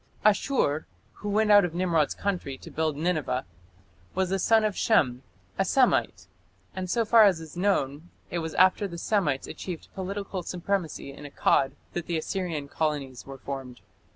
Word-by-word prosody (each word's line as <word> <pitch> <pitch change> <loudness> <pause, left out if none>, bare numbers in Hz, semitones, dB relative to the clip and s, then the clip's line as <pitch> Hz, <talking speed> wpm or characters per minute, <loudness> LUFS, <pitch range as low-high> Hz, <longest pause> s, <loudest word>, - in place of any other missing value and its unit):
Asshur, 205 - +2 0.4
who 205 - -3
went 210 +1 +3
out 205 -1 +8
of 175 -2 -2
Nimrod's 170 -5 +1
country 180 -9 -3
to - - -12
build 155 -2 -1
Nineveh, 155 -6 -1 0.7
was 190 0 0
a 195 - +1
son 220 +3 +4
of 210 -2 0
Shem 125 - +2 0.4
a - - +5
Semite, 255 +6 +2 0.5
and 185 -1 -4
so 230 +3 +1
far 225 0 +7
as 190 -5 +3
is 160 0 -10
known 175 -4 0 0.2
it 175 - -1
was 160 -1 -5
after 185 +3 +4
the 170 -2 -8
Semites 170 -8 0
achieved 175 -4 -7
political 195 0 -4
supremacy 175 -5 -3
in 145 - -11
Akkad 140 -1 +2 0.2
that 175 -1 -4
the 170 - 0
Assyrian 160 -3 -3
colonies 140 -5 -3
were 135 0 -8
formed. 135 -2 -7
175 Hz, 165 wpm, -27 LUFS, 145-200 Hz, 0.7 s, out